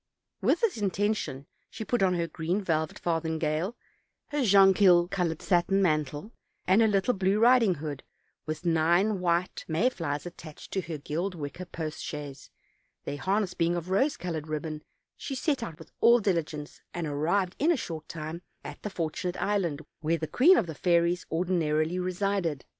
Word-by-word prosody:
With - - +2
this 455 - +1
intention 200 -8 -1 0.2
she 220 - -7
put 245 0 0
on 185 -2 +3
her 170 -1 0
green 165 +3 -2
velvet 160 -3 -1
farthingale, 160 +3 -1 0.5
her 295 -2 0
jonquil 195 -4 +6
colored 175 -5 -1
satin 185 +1 +2
mantle, 155 - 0 0.3
and 190 +5 +5
her 225 - +5
little 205 +4 +2
blue 195 0 +1
riding 230 -4 +5
hood; 145 -2 -5
and - - -44
with 155 +2 -4
nine 175 +5 +3
white 175 0 0
may 185 +11 +2
flies 145 - -3
attached 170 -3 -10
to 190 - 0
her 165 -3 -5
gilded 170 +6 -3
wicker 145 +5 -6
post 160 -3 -5
chaise, 145 -3 -7 0.5
their 145 - -4
harness 195 +5 0
being 170 +1 +1
of 175 +1 -4
rose 265 +10 +2
colored 165 -4 -4
ribbon, 155 0 -4 0.4
she 270 - -5
set 275 0 0
out 165 -9 -6
with 160 -2 -14
all 235 +1 +7
diligence, 165 -7 -2
and 175 -1 -2
arrived 170 +6 0
in 315 +5 +4
a 335 - +2
short 160 -8 -6
time 160 +1 -6 0.2
at - - -9
the 210 - -4
For 165 -5 -2
tunate 180 +2 -4
Island, 175 -7 0 0.2
where 165 +1 0
the 160 - -3
queen 290 - +5
of - - +2
the 160 - -6
fairies 170 +2 +1
ordinarily 165 -1 0
resided. 180 -5 -1
175 Hz, 175 wpm, -28 LUFS, 155-195 Hz, 0.5 s, all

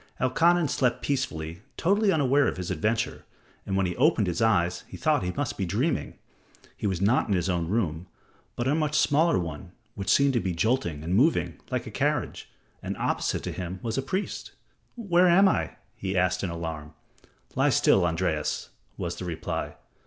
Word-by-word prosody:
Elkanan 165 +6 +3
slept 125 -3 0
peacefully, 85 - -2 0.2
totally 200 +3 +3
unaware 145 -3 +3
of - - -2
his 90 0 -4
adventure, 110 +6 -1 0.4
and 95 - 0
when 95 - +2
he 90 - -2
opened 130 -5 +3
his 90 +1 -2
eyes 90 -6 +2
he - - -9
thought - - +2
he 90 0 -2
must 140 -4 -3
be - - 0
dreaming. 120 - -1 0.6
He - - -3
was 95 -2 -2
not 110 +6 +3
in 100 - +1
his 90 0 0
own 85 -2 0
room, 90 -4 -1 0.5
but 120 - -2
a 140 - +3
much 150 -1 +1
smaller 155 +3 +3
one 85 +1 -5 0.2
which 100 -3 -5
seemed 140 -1 +4
to 120 - +2
be 95 -5 -2
jolting 85 - 0
and 85 +3 -2
moving, 140 - +2
like - - -2
a - - -7
carriage, - - -1 0.3
and - - -4
opposite - - -1
to - - -3
him 90 +1 -5
was 115 -1 -2
a 135 - 0
priest. 185 +9 -4 0.4
"Where 185 -6 +3
am 190 +3 +6
I?" - - 0 0.2
he 95 -1 -3
asked 90 0 +1
in 95 - -1
alarm. 80 -2 -6 0.6
"Lie - - +2
still, 95 - +4
Andreas," 80 -2 -1 0.3
was 85 0 -4
the 90 - -5
reply. 80 -2 -4
100 Hz, 185 wpm, -27 LUFS, 85-140 Hz, 0.6 s, am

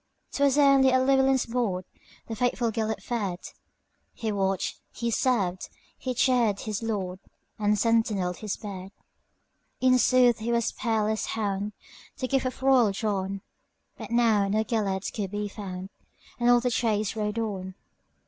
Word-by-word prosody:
'T - - -4
was 280 0 +3
only 275 -2 +5
at 260 0 +3
Llewelyn's 270 -1 +3
boardThe 225 -1 -5
faithful 245 -1 0
Gêlert 220 -1 -2
fed; 205 -7 -2 0.8
He 220 -2 -3
watched, 195 -2 -1
he 235 0 -3
served, 200 -8 0 0.3
he 255 -1 -4
cheered 235 -5 +2
his 215 -1 -3
lord, 195 -5 -3 0.4
And 210 0 +2
sentineled 210 -5 +1
his 215 -3 -4
bed.In 205 +5 -4
sooth 250 -2 +4
he 225 +2 -2
was 235 -1 +1
a - - -22
peerless 220 -2 -1
hound, 205 -1 -2 0.4
The 255 - -2
gift 265 -1 +1
of 255 +1 -7
royal 255 -6 +5
John; 195 -1 -2 0.5
But - - -9
now 225 -4 +3
no 215 +2 +1
Gêlert 205 -4 -2
could 200 -3 -3
be 205 +1 -3
found, 195 -2 -7 0.5
And 240 0 +3
all 245 0 +6
the 250 0 0
chase 215 -3 0
rode 210 0 -2
on. 190 -4 -3
220 Hz, 150 wpm, -27 LUFS, 200-245 Hz, 0.8 s, all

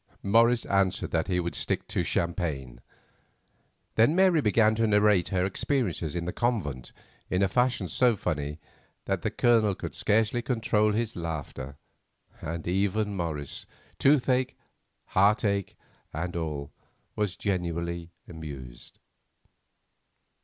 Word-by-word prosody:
Morris 115 +3 +4
answered 100 -2 +1
that 80 -1 0
he 90 -2 +1
would 85 0 -2
stick - - -2
to - - -1
champagne. 70 -8 -2 1.1
Then 115 +9 +4
Mary 185 -4 +5
began 110 -1 +4
to 115 +1 +1
narrate 105 -4 +4
her 90 -1 0
experiences 95 - -1
in 85 -1 -2
the 90 - -3
convent 95 - -2 0.4
in 90 +2 +2
a - - +4
fashion 125 -2 +1
so 120 +8 +3
funny 75 -5 -3 0.5
that - - -1
the - - 0
Colonel 110 -5 +3
could - - -6
scarcely 110 +3 +2
control 110 -3 +1
his 115 +1 -1
laughter, 75 -5 -5 0.6
and 80 +1 -5
even 100 +3 0
Morris, 80 -6 -4 0.3
toothache, 130 -2 +3 0.5
heartache, 100 0 +2 0.3
and 85 +3 -4
all, 75 -4 -3 0.4
was 105 -3 -1
genuinely 85 -3 -2 0.2
amused. 70 -7 -8
95 Hz, 120 wpm, -28 LUFS, 85-110 Hz, 1.1 s, Mary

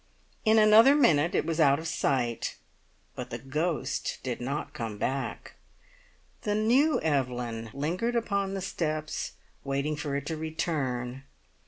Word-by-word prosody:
In 220 0 +5
another 220 +5 +7
minute 170 - +4
it - - +1
was 165 0 -2
out 140 -3 +5
of 160 +2 -5
sight, 125 -6 0 0.6
but 125 0 -6
the 120 - -4
ghost 150 +6 -2
did 125 -2 -3
not 140 +4 -3
come 115 -4 -5
back. 135 +5 -3 0.9
The 210 -2 -1
new 245 +6 +3
Evelyn 125 -6 -1
lingered 175 - -1
upon 200 -4 0
the 195 - -3
steps, 155 -4 -3 0.3
waiting 140 +2 -1
for 145 -1 -3
it 140 0 -3
to 160 - -3
return. 140 -6 -2
155 Hz, 140 wpm, -28 LUFS, 130-195 Hz, 0.9 s, another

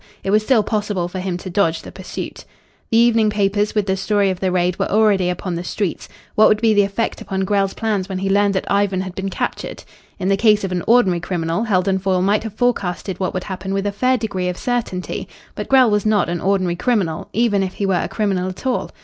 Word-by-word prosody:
It 195 - -1
was 215 +1 +4
still 220 0 +3
possible 205 -4 -1
for 185 +1 -6
him 180 -1 -2
to 185 - -8
dodge 170 -4 +1
the - - -9
pursuit. - - -7 0.5
The 225 - +2
evening 230 -2 +4
papers 205 0 0
with 210 -2 +1
the 190 -1 0
story 200 0 +1
of 185 - -5
the 190 -1 0
raid 180 0 0
were - - 0
already 205 -4 +3
upon 180 0 -3
the 170 +1 -3
streets. 185 0 -3 0.2
What 215 - +6
would 215 - +3
be 225 -1 +3
the 205 - +5
effect 200 +3 -2
upon 190 0 -3
Grell's 195 -1 0
plans 210 -4 -1
when 190 - -3
he 195 +1 -2
learned 200 0 +2
that 190 - -1
Ivan 200 -2 +1
had 185 -1 -6
been 195 +1 -3
captured? 185 - -4 0.3
In 185 - -3
the 195 - +3
case 210 -1 +4
of 195 - -2
an 180 -1 -1
ordinary 210 -7 +4
criminal, 170 +3 -2
Heldon 190 -2 +1
Foyle 185 -1 +1
might 205 +2 +2
have 220 -2 -7
forecasted 195 -7 -1
what 185 -1 -2
would 185 - -2
happen 190 0 -4
with 195 0 -1
a 205 - 0
fair 255 +5 +1
degree 200 -5 -2
of 180 - -4
certainty. 235 -7 -3 0.3
But - - -5
Grell 260 -4 +5
was 210 -1 +2
not 215 -4 +2
an 170 -1 -2
ordinary 185 -3 +1
criminal, 190 -9 -1
even 220 -3 +2
if 190 -1 -3
he 200 - -2
were 195 - +1
a - - -2
criminal 195 -3 -1
at 185 +7 -10
all. 255 -1 -1
195 Hz, 240 wpm, -20 LUFS, 185-215 Hz, 0.5 s, What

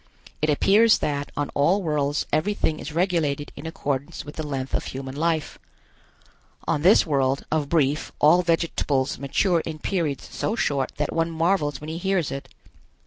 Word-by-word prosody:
It 155 - +1
appears 210 +9 +5
that 145 -1 -2
on 145 -1 -1
all 180 +8 +2
worlds 145 -2 0
everything 155 -1 0
is 150 - -6
regulated 160 -4 0
in - - -7
accordance 140 -4 -3
with 145 - -9
the - - -4
length 135 -2 -4
of - - 0
human 135 0 -6
life. 160 0 -1 1.1
On 145 - +1
this 185 +7 +6
world, 135 -3 0
of 150 -3 0
Brief 150 -2 +1
all 165 +4 +5
vegetables 165 -5 0
mature 170 +6 +1
in 160 -1 -5
periods 155 -4 -2
so 215 - -1
short 140 - 0
that 150 - -1
one 165 0 +1
marvels 165 -4 0
when 150 - -8
he 165 - -4
hears 190 -4 0
it. 140 - -6
155 Hz, 165 wpm, -24 LUFS, 140-170 Hz, 1.1 s, this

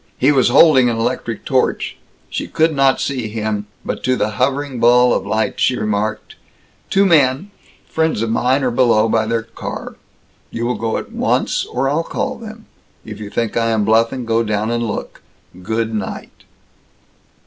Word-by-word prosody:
He 135 +3 +4
was 135 -3 +3
holding 130 -7 +6
an 115 - -2
electric, 115 -1 -3
torch. 130 -2 0 0.3
She - - -4
could 160 0 +1
not 135 -1 +3
see 130 -5 -2
him, 105 -1 -3 0.2
but - - -4
to 130 - +2
the 110 - -1
hovering 135 +4 -1
ball 125 +1 +5
of - - -2
light 110 +2 -1
she 130 - +2
remarked, 105 +1 -2 0.5
"Two 195 +1 +3
men, 155 +2 +3 0.4
friends 160 -8 0
of 115 - -2
mine, 130 +4 +1
are 125 - +1
below, 115 -3 +3
by 110 0 +1
their 115 0 -1
car. 115 0 -7 0.5
You 115 - -4
will 125 - 0
go 115 -2 -2
at - - -7
once, - - 0
or 135 - -1
I'll 145 +4 +1
call 260 +8 -4
them. 220 -1 -10 0.4
If 110 -1 -8
you 105 -1 -7
think 115 +1 -2
I 115 -1 +1
am 110 -2 +1
bluffing, 115 +3 +2
go 115 0 +1
down 110 0 -1
and 120 0 -1
look. 110 -3 -5 0.4
Good 110 +3 -2
night!" 105 -3 -6
115 Hz, 175 wpm, -18 LUFS, 110-135 Hz, 0.5 s, holding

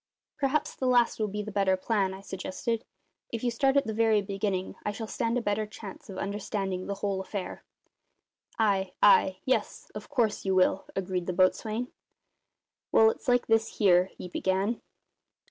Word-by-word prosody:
"Perhaps 285 +1 0
the 260 - -1
last 245 -2 +3
will 215 - +1
be 210 +1 -4
the 215 - -6
better 195 -2 +2
plan," 195 -1 0
I 190 - -11
suggested. 195 +4 -4 0.4
"If 230 0 -5
you 245 - +1
start 270 +4 +2
at 280 - +3
the 220 - -3
very 220 -1 +3
beginning 195 -1 -2
I 210 - -1
shall 220 +2 -5
stand 230 +2 -1
a 245 - -2
better 210 0 0
chance 210 -2 -10
of 190 - -7
understanding 195 -2 -3
the 200 - -2
whole 195 -1 -2
affair." 190 -1 -6 0.9
"Ay, 195 -4 +1
ay; 190 -2 +5
yes, 260 - -1
of - - -8
course 240 -7 0
you 190 -1 +1
will," 185 +1 +3
agreed 185 -2 -2
the 180 - -1
boatswain. 215 +6 +1 1.0
"Well, 220 0 +6
it's - - -12
like 245 -1 +3
this 225 0 +1
here," 180 -4 +5
he - - -7
began. 190 +5 -1
205 Hz, 175 wpm, -28 LUFS, 190-230 Hz, 1.0 s, Well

